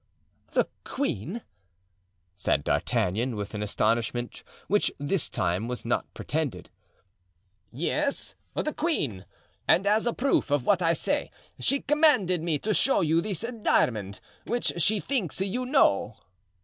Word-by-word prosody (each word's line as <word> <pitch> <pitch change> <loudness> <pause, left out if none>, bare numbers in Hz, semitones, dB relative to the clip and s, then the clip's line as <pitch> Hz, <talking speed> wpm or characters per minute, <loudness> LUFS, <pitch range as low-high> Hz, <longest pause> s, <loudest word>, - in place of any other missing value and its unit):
"The - - +3 0.2
queen!" 215 - -3 0.9
said 95 - 0
D'Artagnan, 115 +7 0
with 105 0 -5
an 105 - -3
astonishment 115 +3 0 0.3
which 205 +1 +2
this 145 +4 -1
time 90 +6 -1
was 125 -1 -4
not 120 - -1
pretended. 145 - -3 1.0
"Yes, 280 - -1 0.2
the 305 - -1
queen! 145 - -1 0.4
And 190 - +4
as 215 +3 +3
a 240 - +1
proof 270 - +1
of 145 -3 +1
what 195 -3 +3
I 165 -1 +3
say - - -1 0.3
she 280 0 +1
commanded 275 - +3
me 165 -2 0
to 215 +9 -1
show 270 - +3
you 165 +1 +3
this 205 +2 -2 0.2
diamond, 105 - +1 0.3
which 240 +1 0
she 210 +5 +3
thinks 215 - -2
you 200 +7 -1
know." 115 - +3
165 Hz, 135 wpm, -27 LUFS, -, 1.0 s, And